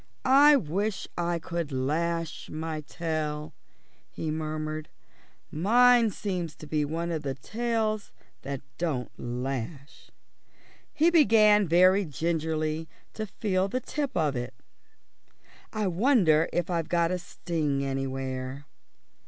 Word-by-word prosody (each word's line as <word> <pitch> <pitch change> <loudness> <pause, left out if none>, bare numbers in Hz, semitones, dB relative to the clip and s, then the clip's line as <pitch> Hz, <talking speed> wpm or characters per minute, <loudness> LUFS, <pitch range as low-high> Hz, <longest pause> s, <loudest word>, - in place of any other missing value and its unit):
"I 285 +3 +7
wish 205 - -1
I 170 0 0
could 170 -2 -4
lash 160 +5 -2
my 155 0 -4
tail," 155 -2 -3 0.6
he 160 - -4
murmured; 155 0 -4 0.6
"mine 235 +7 +5
seems 180 -6 -4
to - - -11
be 150 0 0
one 165 +3 -2
of 160 -2 -2
the 135 -2 -3
tails 220 - -2 0.3
that 140 -1 -5 0.2
don't 145 -8 -2
lash." 130 +3 -5 0.8
He 330 +3 +3
began 215 - +5
very 185 +4 +5
gingerly 160 0 -2 0.2
to 215 -1 -4
feel 190 -1 0
the 250 +6 -2
tip 280 -2 -3
of 150 -4 +1
it. 120 0 -4 1.2
"I 215 -1 -1
wonder 180 - +3
if 175 +1 -1
I've 165 -2 -1
got 170 -1 +2
a 185 - -1
sting 155 -5 -2
anywhere." 135 0 -4
165 Hz, 120 wpm, -28 LUFS, 150-200 Hz, 1.2 s, I